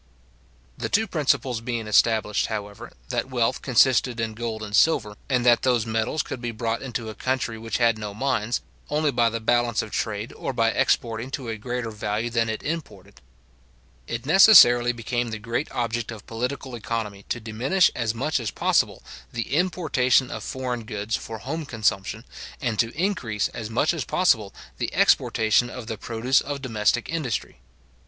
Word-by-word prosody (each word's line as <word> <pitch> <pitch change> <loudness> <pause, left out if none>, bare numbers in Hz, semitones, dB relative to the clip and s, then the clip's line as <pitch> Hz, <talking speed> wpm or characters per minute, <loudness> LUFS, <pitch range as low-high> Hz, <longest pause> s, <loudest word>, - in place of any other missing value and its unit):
The - - -2
two 220 +2 +2
principles 135 - 0
being 115 -1 -3
established, 105 0 +2
however, 105 -2 -6 0.2
that - - -2
wealth 120 -3 0
consisted 125 -1 +3
in 110 -1 -2
gold 110 -1 -4
and 105 -1 -3
silver, 105 -7 +3
and 125 -2 +1
that 120 -1 +5
those 120 -4 +2
metals 115 +6 -1
could 130 -4 -6
be 120 - -3
brought 115 0 -2
into 120 -4 -4
a - - -6
country 125 +1 -2
which 110 0 -3
had 115 -2 +2
no 105 -1 -5
mines, 115 0 -1 0.3
only 150 0 +1
by 120 -2 +3
the 115 0 -3
balance 120 0 +1
of 110 - -9
trade, 110 +1 -3
or - - -4
by 115 -2 +2
exporting 115 0 0
to 135 -3 -5
a 110 - -2
greater 120 +1 -4
value 105 +2 -2
than 115 -1 +1
it 110 - -4
imported; 100 - -6 0.9
it 115 +2 -4
necessarily 145 - +8
became 120 0 -2
the 110 - -4
great 115 +6 -3
object 120 -1 -2
of 110 -3 -8
political 125 +3 -4
economy 110 -3 -4
to 120 - -1
diminish 120 - +2
as 115 -2 -2
much 140 +5 0
as 115 -3 -3
possible - - +1 0.3
the 115 +2 -4
importation 150 -7 +2
of - - -5
foreign 125 -3 -4
goods 105 -1 -3
for 115 - -6
home 155 +8 -4
consumption, 110 -4 -1 0.4
and 115 -5 -2
to 115 - +3
increase 125 - 0
as 110 -2 -6
much 125 +9 +1
as 160 -5 -2
possible 110 - +2 0.3
the - - -2
exportation 110 +2 +3
of 125 -1 -7
the 110 0 -4
produce 115 +4 +1
of 145 0 -4
domestic 115 -2 0
industry. 140 - -3
115 Hz, 175 wpm, -24 LUFS, 110-130 Hz, 0.9 s, necessarily